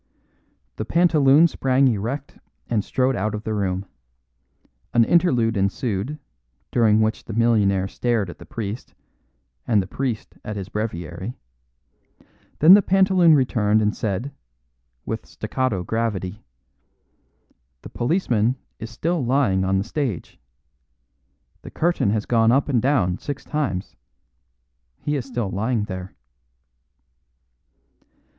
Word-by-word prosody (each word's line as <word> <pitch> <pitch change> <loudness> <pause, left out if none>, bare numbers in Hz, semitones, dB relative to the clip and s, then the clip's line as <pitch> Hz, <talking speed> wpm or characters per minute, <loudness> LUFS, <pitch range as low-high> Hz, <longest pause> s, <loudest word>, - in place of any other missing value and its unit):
The - - -2
pantaloon 160 0 +4
sprang 135 -3 +2
erect 120 +5 -3 0.3
and 110 -4 0
strode 130 +3 0
out 110 +1 -1
of 105 - -6
the 110 - -3
room. 95 -2 -1 1.1
An 120 - +6
interlude 125 -10 +2
ensued, 100 +6 -1 0.5
during 110 -3 +3
which 110 +1 -1
the 110 - -6
millionaire 105 -4 +2
stared 115 -1 -1
at 85 - -10
the - - -11
priest, 110 +1 -6 0.7
and 110 -3 +3
the 95 - -1
priest 115 +4 -4
at 105 - -5
his 100 -2 -6
breviary; 95 0 -5 1.2
then 160 +5 +8
the 205 - +8
pantaloon 190 -4 +4
returned 110 -6 +2
and 105 0 +1
said, 110 +6 -3 0.7
with - - -4
staccato 130 -9 -2
gravity, 105 -2 -3 1.4
"The - - -9
policeman 120 - 0 0.2
is 110 - -6
still 165 +6 -1
lying 120 -7 +2
on 95 0 +1
the 95 - 0
stage. 120 - -4 1.2
The - - -10
curtain 170 - 0
has 105 0 0
gone 115 -1 +3
up 135 +3 +2
and 125 -5 +2
down 105 -10 +1
six 140 -1 -6
times; 140 -12 -3 1.1
he 150 - -1
is 135 -2 -3
still 120 -6 -3
lying 110 +3 -1
there." 95 -2 -7
115 Hz, 125 wpm, -22 LUFS, 100-135 Hz, 1.4 s, then